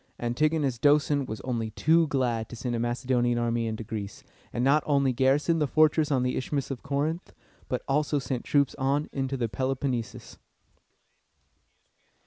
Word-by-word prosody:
Antigonus 135 +1 0
Doson 145 -1 +3
was 110 - -6
only 115 -3 -2
too 160 +8 +3
glad 120 -6 -1
to - - -8
send 120 +1 -3
a - - -2
Macedonian 120 0 0
army 120 -1 0
into 110 0 -4
Greece, 105 -2 -6 0.3
and 120 - -2
not 140 +3 +4
only 140 -3 +2
garrisoned 145 +6 +2
the 150 - +2
fortress 155 +1 +3
on 130 -3 +2
the 125 - 0
Isthmus 140 +1 -2
of 130 - -5
Corinth, 145 - -2 0.4
but - - -2
also 145 +1 +1
sent 130 -2 -3
troops 140 -2 +2
on 140 +3 0
into 135 0 -2
the 120 -2 -1
Peloponnesus. 130 0 -3
135 Hz, 155 wpm, -27 LUFS, 120-145 Hz, 0.4 s, not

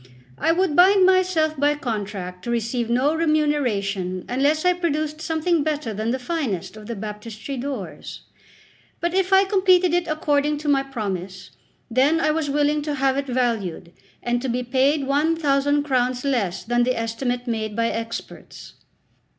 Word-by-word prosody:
I 325 - +2
would 345 -2 +1
bind 375 +2 +6
myself 365 -4 +2
by 290 +1 +3
contract 200 -8 -5
to - - -5
receive 235 0 -1
no 255 +6 +2
remuneration 245 - 0
unless 285 +6 +1
I 360 - +5
produced 310 -3 -2
something 320 +1 0
better 295 -6 -2
than 215 +2 -2
the 255 - 0
finest 250 - -3
of 215 -1 -11
the 235 - -4
Baptistery 215 +5 -7
doors. 260 -6 -6 0.8
But 345 0 -1
if 380 0 +1
I 385 0 +6
completed 375 -3 +3
it 350 -1 +1
according 295 -1 +1
to 300 +1 -7
my 280 -2 +3
promise, 195 -8 -5 0.4
then 275 +7 +3
I 305 - +2
was 310 -2 -1
willing 295 +1 +1
to 295 0 -3
have 270 -1 +1
it 280 0 -2
valued, 225 -9 -2 0.3
and 240 0 0
to 265 - -3
be 250 +1 -1
paid 270 +3 +1
one 295 +4 +2
thousand 285 -2 +1
crowns 255 -2 0
less 225 -10 -1
than 240 +1 +1
the 250 +1 +1
estimate 245 +2 -2
made 220 -3 -3
by 230 0 +1
experts. 230 0 -7
275 Hz, 165 wpm, -23 LUFS, 230-310 Hz, 0.8 s, bind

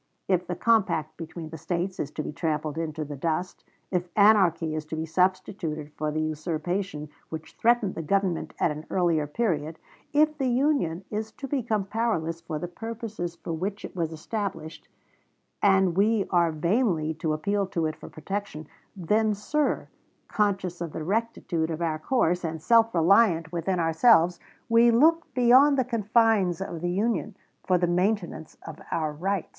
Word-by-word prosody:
If 180 -2 +1
the 180 - -3
compact 170 -9 +1
between 165 -1 -8
the 160 0 -8
States 180 +4 -3
is 145 - -2
to 155 - -3
be - - -5
trampled 150 -1 -2
into 155 -1 -3
the 145 0 -6
dust; 165 +5 -3 0.3
if 180 -1 -1
anarchy 190 -7 +4
is 155 0 -3
to 160 - -5
be 160 0 -3
substituted 160 -3 -1
for 155 0 -2
the 155 - -2
usurpation 155 +2 -3 0.2
which 160 -1 -7
threatened 235 -4 +2
the - - -5
Government 185 +1 -1
at - - +2
an 150 +1 -7
earlier 170 -5 +1
period; 160 -4 -1 0.3
if 305 +1 +3
the 265 - +1
Union 245 - +1
is 220 +1 -3
to 275 - -7
become 230 -7 -1
powerless 190 -7 -1
for 165 -2 -4
the 175 - -4
purposes 220 -3 -6
for 165 - -6
which 195 +6 -4
it - - -10
was 165 -3 -1
established, 165 -1 -5 0.7
and 190 -3 +4
we 205 +1 +2
are 170 -2 +3
vainly 170 -1 +1
to 155 0 -2
appeal 200 +5 -1
to 170 -3 -1
it 155 0 -2
for - - -11
protection 175 -1 -5 0.3
then, 210 +4 +1
sir, 295 +9 -1 0.4
conscious 195 -4 -1
of 170 -3 -4
the 155 - -4
rectitude 185 -4 -1
of 160 -1 -3
our 160 -2 -1
course, 180 -4 +1
and 160 -1 -3
self 230 +6 +4
reliant 170 -1 +4
within 175 +2 -1
ourselves, 170 +1 +4 0.3
we 230 +1 +5
look 315 +8 +3
beyond 260 +4 +6
the 260 - +2
confines 220 -5 +2
of 175 -4 -5
the 175 - -1
Union 205 0 -1 0.3
for 185 - +2
the 175 - +1
maintenance 180 -2 -1
of 160 -1 -8
our 155 -2 -1
rights." 190 +4 -2
180 Hz, 170 wpm, -26 LUFS, 160-215 Hz, 0.7 s, beyond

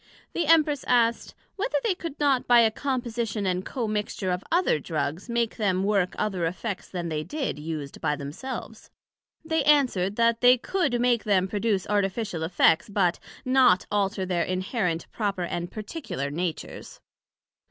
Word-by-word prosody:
The 340 -3 -1
Empress 305 -3 +4
asked, 235 -1 +2 0.2
Whether 460 +6 0
they 450 -5 +2
could 335 -4 -7
not 280 -4 +2
by 240 -1 +7
a 225 -1 +4
composition 235 -5 -2
and 185 0 0
commixture 210 -5 -2
of 180 +1 -2
other 345 - +2
Drugs 155 - -3
make 235 -1 -1
them 190 -3 +1
work 195 -3 +1
other 185 -5 -1
effects 190 +4 -5
then 175 -2 -4
they 155 -1 -2
did, 275 - -3
used 150 -2 -6
by 150 - +1
themselves? 220 - -7 0.6
They 320 -2 +1
answered, 255 -10 +3
That 230 0 +2
they 250 0 +7
could 290 -3 0
make 240 -2 +2
them 190 -3 +2
produce 205 -1 0
artificial 200 -3 -1
effects, 165 +1 +3
but 190 -4 +1 0.3
not 255 -8 +4
alter 200 -1 0
their 180 -2 0
inherent, 185 -2 -1
proper 200 -4 -2
and 175 0 -3
particular 210 - -5
natures. 170 +2 -5
210 Hz, 150 wpm, -26 LUFS, 180-245 Hz, 0.6 s, by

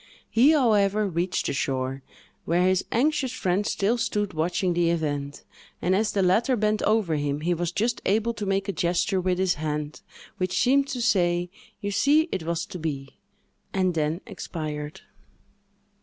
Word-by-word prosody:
He, 245 +6 +5
however, 215 -6 +3
reached 180 0 -1
the - - -1
shore, 135 0 -2 0.4
where 175 +2 +2
his 185 0 +2
anxious 270 +1 +1
friend 195 -4 0
still 225 +5 +1
stood 210 -4 -1
watching 175 +3 0
the 170 -1 +2
event; 145 -4 -2 0.4
and, 185 +2 +1
as 210 +1 +1
the 200 -2 +1
latter 220 +8 +3
bent 215 -1 +1
over 205 -7 +2
him, 145 0 -2
he 175 +3 +1
was 175 0 -2
just 235 +6 -1
able 220 +4 +2
to 205 -3 -5
make 195 +1 0
a - - 0
gesture 180 +3 0
with 180 0 0
his 185 -1 +2
hand, 150 -1 -3 0.4
which 185 -1 -1
seemed 275 +2 +3
to 250 -3 -3
say, 175 -5 +2 0.3
"You 205 -1 -2
see, 295 - +3
it - - -2
was 170 +1 -2
to 180 - -8
be!" 140 -4 -5 0.5
and 185 -2 +1
then 160 +2 -1
expired. 155 -7 -6
185 Hz, 170 wpm, -25 LUFS, 165-215 Hz, 0.5 s, He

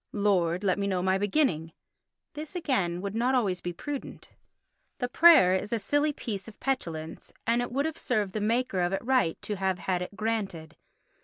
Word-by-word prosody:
"Lord, 190 -4 +1
let 190 -1 +1
me 200 - 0
know 185 -2 0
my 190 +1 +2
beginning." 190 - 0 0.6
This 305 +3 -7
again 195 - 0
would 200 0 -4
not 240 +4 +1
be - - +4
always 195 -7 0
prudent. 260 - -6 0.7
The 245 - -1
prayer 305 - +7
is 190 +3 -2
a 230 - +1
silly 290 +8 +1
piece 215 -8 -5
of 220 - -12
petulance 165 -12 -4
and 235 +1 +2
it 245 - -4
would 275 +4 0
have 320 -1 -3
served 210 -6 -1
the 215 - -2
maker 225 -2 0
of 175 +1 +1
it 195 - -3
right 255 -10 +2
to 210 - -3
have 190 -1 0
had 180 -1 -1
it 180 +3 -6
granted. 200 -8 -3
205 Hz, 190 wpm, -28 LUFS, 180-250 Hz, 0.7 s, prayer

